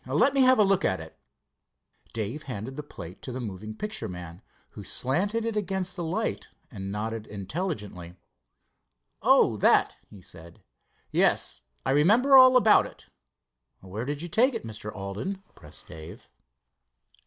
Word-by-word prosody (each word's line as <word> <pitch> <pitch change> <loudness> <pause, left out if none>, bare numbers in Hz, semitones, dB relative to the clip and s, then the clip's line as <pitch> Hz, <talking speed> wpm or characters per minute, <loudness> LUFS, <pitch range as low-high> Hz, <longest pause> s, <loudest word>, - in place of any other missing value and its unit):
Let 280 - +3
me 275 - +3
have 255 0 +6
a 215 - +6
look 195 -1 +2
at 95 - +1
it." 80 0 -11 0.9
Dave 115 +7 -4
handed 125 +3 -5
the 150 - -4
plate 90 - -11
to 130 - -7
the 125 - -5
moving 110 -2 -6
picture 210 - -4
man, 90 -2 -9 0.3
who - - -10
slanted 200 - -1
it 230 -1 -2
against 190 -3 -1
the 175 - -4
light 190 +7 -2 0.2
and 95 -4 -6
nodded 110 +1 -4
intelligently. 105 - -5 1.1
"Oh, - - +4
that?" - - +3
he 100 - -13
said. 85 -1 -13 0.5
"Yes, - - +2 0.2
I - - +1
remember 220 - +5
all 255 -1 +9
about 225 -4 +5
it." - - -17 0.7
"Where 100 +5 -6
did 145 +3 -4
you - - -4
take 240 - +3
it, 225 - -4
Mr. 105 -1 -7
Alden?" 105 - -5
pressed 75 0 -13
Dave. 80 +1 -11
130 Hz, 155 wpm, -27 LUFS, -, 1.1 s, all